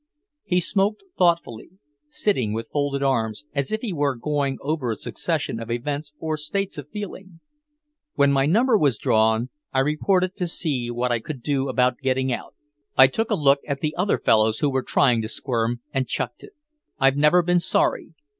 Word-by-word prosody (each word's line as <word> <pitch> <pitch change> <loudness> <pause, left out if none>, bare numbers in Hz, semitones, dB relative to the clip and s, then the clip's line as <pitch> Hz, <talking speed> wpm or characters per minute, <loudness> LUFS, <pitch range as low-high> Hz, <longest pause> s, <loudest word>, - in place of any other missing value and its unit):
He 180 - +1
smoked 200 - 0
thoughtfully, 170 -7 0 0.4
sitting 130 - 0
with 115 +1 -4
folded 145 -1 0
arms, 115 -3 -1
as 140 -2 -2
if 215 0 -1
he 220 -6 -3
were 145 -4 0
going 140 +1 -1
over 145 -3 -2
a 110 - -1
succession 115 - -2
of 115 0 -7
events 145 +5 -3
or 155 -1 -3
states 185 +3 -3
of 145 0 -10
feeling. 190 -3 -8 0.8
"When 140 -1 +4
my 135 0 +2
number 230 - +3
was 140 -7 +2
drawn, 110 +3 +2 0.2
I 130 - +2
reported 180 +6 +1
to 180 -3 -1
see 140 -8 -2
what 120 +1 -1
I 120 - +1
could 130 +1 -8
do 140 -2 0
about 125 -1 +1
getting 130 -1 0
out; - - -7 0.4
I 130 - +10
took 220 +12 -1
a - - +2
look 140 -1 +4
at 140 -2 -3
the 155 -1 -2
other 190 +3 +1
fellows 110 0 +3
who 145 - +1
were 130 0 0
trying 125 -3 +2
to 110 - -4
squirm, 120 0 -2
and 135 -2 0
chucked - - -3
it. 410 - -14 0.4
I've 135 0 +3
never 150 +5 +4
been 175 +1 +3
sorry. 170 -1 0
140 Hz, 185 wpm, -23 LUFS, 125-170 Hz, 0.8 s, I